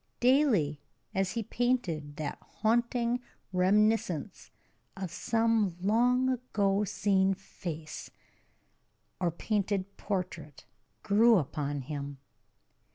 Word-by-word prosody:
Daily, 240 - +3 0.3
as 190 -1 0
he 230 0 -2
painted, 195 -12 -1
that 150 -1 -4
haunting 235 +2 0 0.3
reminiscence 190 -2 +1 0.5
of 190 -3 -4
some 225 -3 +1
long 245 +6 +3
ago 210 -6 +1
seen 195 0 +2
face, 165 -4 -7 1.1
or 180 -2 +2
painted 200 +2 -2
portrait, 175 -7 -4 0.4
grew 225 +3 +5
upon 145 -2 -2
him. 140 0 -5
195 Hz, 90 wpm, -30 LUFS, 165-230 Hz, 1.1 s, grew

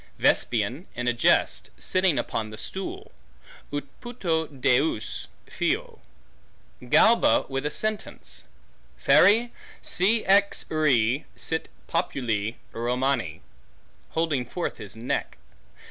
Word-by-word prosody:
Vespasian 120 - +1
in 125 +1 -3
a 120 - +3
jest, 120 - +2
sitting 185 -4 +1
upon 110 -1 -2
the 110 - -9
stool; 190 - -6 0.6
Ut 145 0 -2 0.2
puto 175 -10 -1
deus 130 -3 0 0.2
fio. - - -2 0.9
Galba 230 - +5
with 135 +1 -2
a - - -1
sentence; 215 +5 -4 0.5
Feri, 230 +4 +5 0.3
si 215 +5 +2
ex 200 +1 +3
re 135 -5 +2
sit 160 0 -3 0.2
populi 115 - -1 0.2
Romani; 120 - -1 0.7
holding 160 -6 0
forth 170 +9 -4
his 100 -1 -8
neck. 115 +2 -3
140 Hz, 100 wpm, -26 LUFS, 120-185 Hz, 0.9 s, Galba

